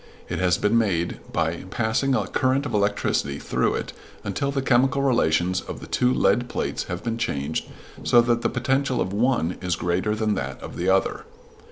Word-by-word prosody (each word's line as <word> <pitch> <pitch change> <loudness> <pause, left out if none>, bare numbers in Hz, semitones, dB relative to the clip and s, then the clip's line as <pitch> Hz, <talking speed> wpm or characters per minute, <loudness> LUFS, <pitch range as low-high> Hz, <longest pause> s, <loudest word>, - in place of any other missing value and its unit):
It - - -2
has 90 -1 +3
been 115 +3 +3
made 90 -6 0
by 85 +2 -1
passing 120 +6 +1
a - - 0
current 130 +2 +1
of 125 - -4
electricity 100 -8 0
through - - 0
it - - -4 0.3
until 140 +8 -2
the 140 -1 -1
chemical 135 +2 +3
relations 90 -8 +2
of - - -7
the - - -9
two 125 0 +1
lead 125 -1 +2
plates - - -2
have 90 0 -5
been 115 -1 -2
changed 70 -8 -2 0.4
so 120 - +5
that 120 0 +1
the - - +1
potential 130 +1 0
of 95 +1 -1
one 110 -6 +1
is 90 -2 0
greater 90 +5 0
than 110 -1 0
that 100 - -4
of - - -8
the 90 +2 0
other. 95 0 +1
110 Hz, 190 wpm, -24 LUFS, 90-125 Hz, 0.4 s, so